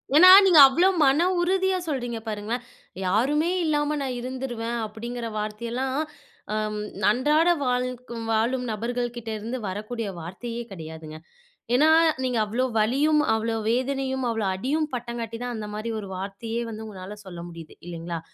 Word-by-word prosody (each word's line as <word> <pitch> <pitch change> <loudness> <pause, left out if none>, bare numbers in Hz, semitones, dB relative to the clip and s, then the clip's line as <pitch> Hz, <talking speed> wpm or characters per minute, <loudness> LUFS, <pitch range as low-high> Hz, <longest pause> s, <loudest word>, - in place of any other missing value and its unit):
ஏன்னா, 365 +4 +9 0.2
நீங்க 355 -5 +7
அவ்ளோ 335 +8 +3 0.2
மன 290 +6 +4
உறுதியா 380 +1 +2
சொல்றீங்க 245 -6 -2
பாருங்களேன். 220 +3 -3 0.4
"யாருமே 270 - +2 0.2
இல்லாம 295 -1 +1
நான் 260 -2 -3
இருந்துருவேன்." 240 -2 -4
அப்படிங்கிற 235 +2 -6
வார்த்தையெல்லாம், 235 +5 -3 0.6
அம் 215 0 -2 0.3
அன்றாட 300 +8 +3 0.2
வாழ்க 250 -1 -2
வாழும் 240 +3 +1
நபர்கள் 240 +3 -2
கிட்டேருந்து 225 +1 -5
வரக்கூடிய 215 +4 -4
வார்த்தையே 230 +8 -6
கிடையாதுங்க. 160 -3 -8 0.6
ஏன்னா 300 +5 +5 0.3
நீங்க 250 -2 0
அவ்ளோ 235 +5 0
வலியும், 285 +8 +3
அவ்ளோ 225 +1 -1
வேதனையும், 265 +1 -1
அவ்ளோ 225 -2 -1
அடியும் 295 +9 -1
பட்டங்காட்டி 235 -2 -4
தான் 245 -1 -3
அந்த 215 -1 -5
மாதிரி 215 +2 -4
ஒரு 200 - -7
வார்த்தையே 205 +5 -4
வந்து 220 0 -7
உங்கனால 200 -1 -8
சொல்ல 175 -2 -8
முடியுது. 165 -2 -11
இல்லைங்களா! 170 -1 -5
235 Hz, 135 wpm, -25 LUFS, 215-265 Hz, 0.6 s, ஏன்னா